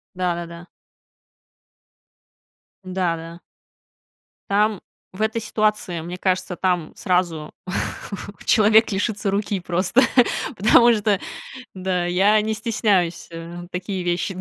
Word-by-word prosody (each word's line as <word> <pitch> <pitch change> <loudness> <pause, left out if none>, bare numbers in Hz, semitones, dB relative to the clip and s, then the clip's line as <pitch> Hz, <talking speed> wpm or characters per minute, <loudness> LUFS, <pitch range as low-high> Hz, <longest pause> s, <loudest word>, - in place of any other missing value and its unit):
Да-да-да. 175 -1 -3 2.2
Да, 185 -2 -1
да. 165 +1 -9 1.1
Там 210 -1 +2 0.3
в 200 - -7
этой 220 +1 0
ситуации, 210 -5 0
мне 175 +2 -6
кажется, 185 -1 -1
там 180 -4 -1
сразу 175 -4 -1 0.9
человек 220 0 +5
лишится 200 0 -1
руки 200 -1 -1
просто, 185 +8 +2 0.5
потому 235 +4 +6
что, 210 -2 +1 0.5
да, 185 -2 -1
я 195 +5 +4
не 220 +1 -1
стесняюсь, 205 -6 0
э, 170 +1 -8
такие 185 0 -4
вещи 175 +2 -1
185 Hz, 100 wpm, -22 LUFS, 175-210 Hz, 2.2 s, потому